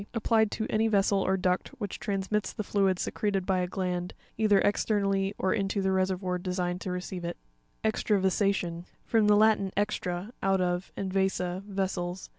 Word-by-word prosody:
—Applied 220 -1 +3
to 220 - -3
any 220 +1 +2
vessel 200 -2 +3
or 190 0 +1
duct 180 -1 0
which 205 -4 -4
transmits 200 +1 -1
the 215 - -4
fluid 195 -2 +2
secreted 195 0 -1
by 190 -1 +1
a 180 - 0
gland, 180 -1 -3 0.2
either 210 -2 +4
exter. 205 +1 +2
nally 195 0 0
or 190 - +1
into 200 -1 -1
the 190 0 +1
reseryoir 185 -1 0
designed 180 -1 -2
to - - -4
receive 180 0 -4
it. 170 0 -4 0.5
Exrravasa'tion.—From 195 -1 +1
the 210 - +6
Latin, 210 -2 +4
extra, 205 0 -2
out 195 0 +2
of, 180 0 -1
and 190 -1 -3
vasa, 190 -1 0
vessels. 190 -2 -3
195 Hz, 165 wpm, -29 LUFS, 180-205 Hz, 0.5 s, the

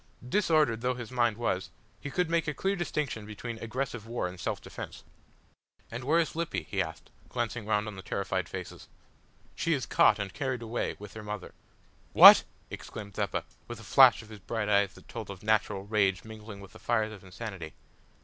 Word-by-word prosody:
Disordered 155 - +2
though 125 +1 0
his 120 -1 -7
mind 120 -4 +2
was, 95 -6 -1 0.3
he 140 - -6
could 180 +4 0
make 165 0 +1
a 150 - -1
clear 195 +1 0
distinction 150 - -2
between 115 +2 -6
aggressive 120 0 -4
war 115 -5 -2
and 90 0 -9
self - - -2
defence. - - -9 0.9
"And 115 +2 -5
where 155 +6 +3
is 165 -2 +1
Lippy?" 170 0 -2
he - - -1
asked, - - -6 0.2
glancing 120 -2 -3
round 105 -1 +1
on 105 - -6
the - - -6
terrified 95 -1 -2
faces. 95 -1 -7 0.7
"She 165 - 0
is 135 -4 -1
caught 105 - +5
and 100 -3 -4
carried 130 -4 -2
away 115 +1 -2
with 105 - -10
her 110 - -7
mother." 105 -2 -6 0.6
"What!" - - +11 0.3
exclaimed 100 -2 -8
Zeppa, 100 -2 -1 0.2
with 120 -1 -7
a - - -11
flash 130 +2 +6
of 110 - -16
his 110 -2 -10
bright 105 +2 -3
eyes 100 -2 +3
that - - -16
told 110 -4 -7
of 100 -1 -8
natural 105 -2 +1
rage 100 -3 +1
mingling 110 -2 -10
with 100 - -13
the - - -13
fires 110 -2 0
of 100 -3 -12
insanity. 95 -4 -7
110 Hz, 195 wpm, -29 LUFS, 100-125 Hz, 0.9 s, What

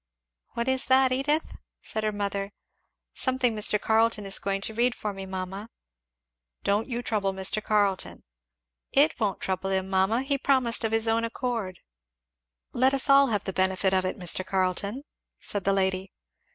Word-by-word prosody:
"What 235 +1 -2
is 260 0 +2
that, 260 0 +4
Edith?" 290 +5 0 0.3
said 220 - -3
her 215 - +1
mother. 200 -1 -3 0.6
"Something 255 -3 +1
Mr. 210 0 +2
Carleton 220 -1 +2
is 195 0 -1
going 195 0 -2
to 220 - -1
read 240 +2 +1
for 210 -1 -4
me, 195 0 -7
mamma." 190 +3 -6 0.9
"Don't 205 +5 0
you 240 0 -3
trouble 205 -5 -1
Mr. 190 +3 0
Carleton." 205 -3 0 0.7
"It 295 +4 +3
won't 205 -4 -1
trouble 190 0 -2
him, 190 0 -1
mamma 195 +6 +2
he 275 0 -1
promised 255 -5 +2
of 225 - 0
his 225 0 +2
own 225 +1 +2
accord." 230 -5 -3 0.9
"Let 260 +2 +3
us 275 +1 +1
all 275 0 +7
have 210 -4 -1
the 190 - -4
benefit 190 +1 +1
of 185 -1 +2
it, 185 - -3
Mr. 180 0 0
Carleton," 190 +6 -1 0.4
said 205 -2 -4
the 195 - +3
lady. 190 0 -1
210 Hz, 165 wpm, -27 LUFS, 190-245 Hz, 0.9 s, all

